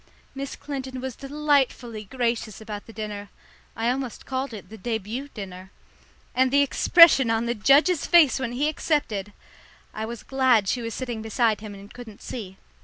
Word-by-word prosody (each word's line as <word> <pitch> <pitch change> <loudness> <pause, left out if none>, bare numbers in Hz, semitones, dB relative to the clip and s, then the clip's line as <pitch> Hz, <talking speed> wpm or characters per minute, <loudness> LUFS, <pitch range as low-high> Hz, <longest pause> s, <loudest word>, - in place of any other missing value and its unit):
Miss 275 0 -5
Clinton 265 -2 -6
was 260 -1 -5
delightfully 275 -6 0
gracious 235 -2 -2
about 215 -2 -7
the - - -10
dinner 210 -2 -6 0.5
I 230 +2 +1
almost 255 -2 -4
called 265 0 -3
it 215 -3 -9
the 220 - -10
début 230 +5 -4
dinner 190 -3 -8 0.6
and 260 0 +3
the 280 +2 +4
expression 280 -2 +6
on 225 +1 +1
the 235 - 0
judge's 280 - +4
face 320 -7 +6
when 240 -2 -3
he 280 +5 +1
accepted! 285 - -1 0.6
I 220 0 -4
was 235 0 -7
glad 255 -6 +3
she 245 - 0
was 230 -1 -4
sitting 240 -4 -4
beside 220 -1 +1
him 210 -2 -8
and 200 +1 -13
couldn't 235 -4 -11
see. 190 -6 -7
240 Hz, 170 wpm, -25 LUFS, 215-270 Hz, 0.6 s, expression